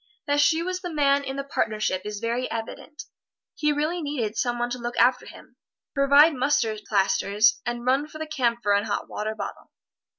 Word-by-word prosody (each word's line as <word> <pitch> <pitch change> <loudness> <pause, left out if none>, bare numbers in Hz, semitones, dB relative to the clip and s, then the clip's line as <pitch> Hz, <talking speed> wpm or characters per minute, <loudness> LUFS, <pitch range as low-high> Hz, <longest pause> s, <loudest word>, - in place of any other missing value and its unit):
That 290 0 +1
she 320 +3 +3
was 365 +1 -3
the 355 - -5
man 280 -2 +2
in 270 -1 -5
the 275 - -3
partnership 215 -8 -1
is 210 -1 -5
very 235 +3 -2
evident. 230 +6 -7 0.5
He 300 -1 0
really 305 +4 -1
needed 255 -8 -3
some 240 +1 -1
one 240 0 -2
to 250 - -4
look 240 0 -5
after 250 +1 +3
him, - - -14 0.4
provide 280 +3 +5
mustard 250 -5 0
plasters 200 +2 +2
and 240 0 -3
run 270 +4 +2
for 310 - -11
the 315 - -4
camphor 240 -8 0
and 205 +2 +1
hot 205 - -2
water 215 +1 -4
bottle. 200 -2 -7
250 Hz, 190 wpm, -25 LUFS, 220-290 Hz, 0.5 s, provide